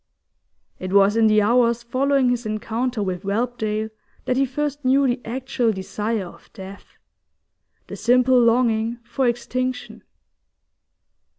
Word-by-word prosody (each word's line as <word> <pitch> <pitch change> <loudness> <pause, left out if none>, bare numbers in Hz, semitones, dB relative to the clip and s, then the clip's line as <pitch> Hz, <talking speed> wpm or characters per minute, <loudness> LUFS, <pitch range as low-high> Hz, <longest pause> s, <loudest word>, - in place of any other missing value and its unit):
It 185 +1 -5
was 200 +1 +5
in 225 -1 +4
the 215 -1 +4
hours 235 +1 +2
following 260 +1 +1
his 245 -1 -2
encounter 225 +2 -2
with 185 -2 -3
Whelpdale 220 0 -2 0.3
that 250 - 0
he 270 +1 +2
first 290 +2 -3
knew 270 +2 +3
the 245 -1 0
actual 250 -1 -1
desire 210 +1 -3
of 175 - -15
death, 195 +1 -12 0.9
the - - -8
simple 250 +1 +3
longing 230 -1 +2
for 240 +3 -1
extinction. 250 +1 -3
235 Hz, 125 wpm, -22 LUFS, 215-255 Hz, 0.9 s, was